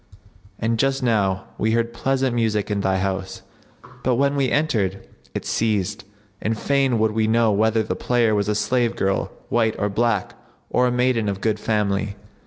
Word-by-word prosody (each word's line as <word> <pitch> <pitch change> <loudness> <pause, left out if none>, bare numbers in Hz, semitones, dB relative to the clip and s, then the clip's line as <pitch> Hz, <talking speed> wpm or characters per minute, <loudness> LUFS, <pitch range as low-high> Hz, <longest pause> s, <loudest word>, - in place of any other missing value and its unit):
'[FN#71] - - -36 0.5
And 115 0 -1
just 135 0 +1
now 100 -5 +1 0.2
we 110 +1 +1
heard 115 0 0
pleasant 135 +1 0
music 110 -3 0
in 100 -1 0
thy 95 -1 +1
house, 95 0 -3 0.6
but 125 -1 +2
when 140 +3 +2
we 135 -2 +1
entered, 110 -11 0 0.3
it - - -3
ceased; 105 -1 -1 0.4
and 110 +1 -1
fain 135 -1 +1
would 110 0 +2
we 110 0 +1
know 115 0 +3
whether 110 +2 +2
the - - -3
player 120 -3 +1
was 105 0 0
a 105 - +1
slave 120 +3 +1
girl, 95 0 0 0.2
white 115 -2 +2
or 105 - 0
black, 110 -1 0 0.4
or 125 0 +3
a - - 0
maiden 125 -3 +1
of 100 -1 -3
good 110 0 0
family." 105 -2 0
110 Hz, 185 wpm, -22 LUFS, 105-120 Hz, 0.6 s, know